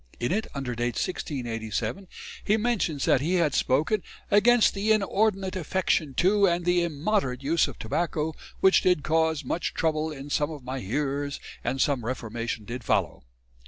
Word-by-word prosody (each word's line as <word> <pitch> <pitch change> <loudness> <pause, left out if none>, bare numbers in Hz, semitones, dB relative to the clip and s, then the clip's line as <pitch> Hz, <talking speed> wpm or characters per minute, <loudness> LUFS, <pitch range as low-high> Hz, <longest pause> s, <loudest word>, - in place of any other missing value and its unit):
In 120 - -1
it, 215 +4 0
under 135 -3 -3
date 120 0 -2
1687, 120 - -3 0.4
he 215 - +2
mentions 210 - 0
that 130 - +3
he 170 +6 0
had 165 -5 +2
spoken 155 +13 +1 0.3
"against 230 +3 +5
the 205 +2 0
inordinate 200 -2 +1
affection 170 -5 0
to 200 +5 +4
and 175 -1 0
the 175 0 +3
immoderate 155 -4 -1
use 160 +4 +2
of 140 - -9
tobacco 160 +5 -1 0.3
which 190 0 +5
did 180 -5 +2
caus 160 -1 +1
much 165 +7 -2
trouble 155 -1 0
in 145 -1 -8
some 145 +1 +1
of 150 -4 -8
my 130 +1 -4
hearers 140 +6 -2 0.2
and 135 - -2
some 135 -3 +1
reformation 115 -2 -4
did 120 +2 -6
follow." - - 0
155 Hz, 160 wpm, -26 LUFS, 130-185 Hz, 0.4 s, against